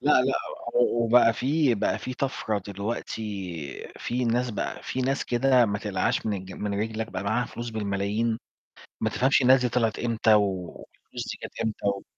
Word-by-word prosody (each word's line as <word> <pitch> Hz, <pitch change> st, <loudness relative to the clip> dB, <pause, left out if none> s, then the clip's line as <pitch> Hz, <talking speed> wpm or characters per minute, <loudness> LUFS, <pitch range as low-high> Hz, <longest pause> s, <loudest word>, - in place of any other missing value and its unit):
لأ، 145 Hz, +3 st, +3 dB
لأ، 135 Hz, +1 st, +1 dB, 0.4 s
وبقى 120 Hz, -1 st, +4 dB
في 140 Hz, +2 st, +2 dB
بقى 100 Hz, -, 0 dB
في 130 Hz, -, -5 dB
طفرة 120 Hz, -5 st, -1 dB
دلوقتي، 100 Hz, -, -5 dB
في 125 Hz, +1 st, -1 dB
ناس 120 Hz, +1 st, +1 dB
بقى 105 Hz, -, -4 dB
في 130 Hz, -, -3 dB
ناس 135 Hz, +2 st, 0 dB
كده 125 Hz, 0 st, +4 dB
ما 105 Hz, 0 st, -1 dB
تقلعهاش 100 Hz, -1 st, -1 dB
من 110 Hz, -, +1 dB
الج 95 Hz, 0 st, -8 dB
من 100 Hz, +2 st, -3 dB
رِجلك، 110 Hz, 0 st, -3 dB
بقى 90 Hz, -, -3 dB
معاها 110 Hz, +5 st, +1 dB
فلوس 120 Hz, 0 st, -6 dB
بالملايين، 105 Hz, +2 st, -1 dB, 0.6 s
ما 110 Hz, -, +1 dB
تفهمش 135 Hz, +4 st, +3 dB
الناس 130 Hz, +1 st, +6 dB
دي 125 Hz, -, +1 dB
طلعت 115 Hz, -2 st, 0 dB
إمتى 115 Hz, -2 st, +3 dB
والفلوس 95 Hz, -4 st, -2 dB
دي -, -, -9 dB
جات -, -, -5 dB
إمتى. 100 Hz, -3 st, -1 dB
115 Hz, 170 wpm, -26 LUFS, 100-125 Hz, 0.6 s, الناس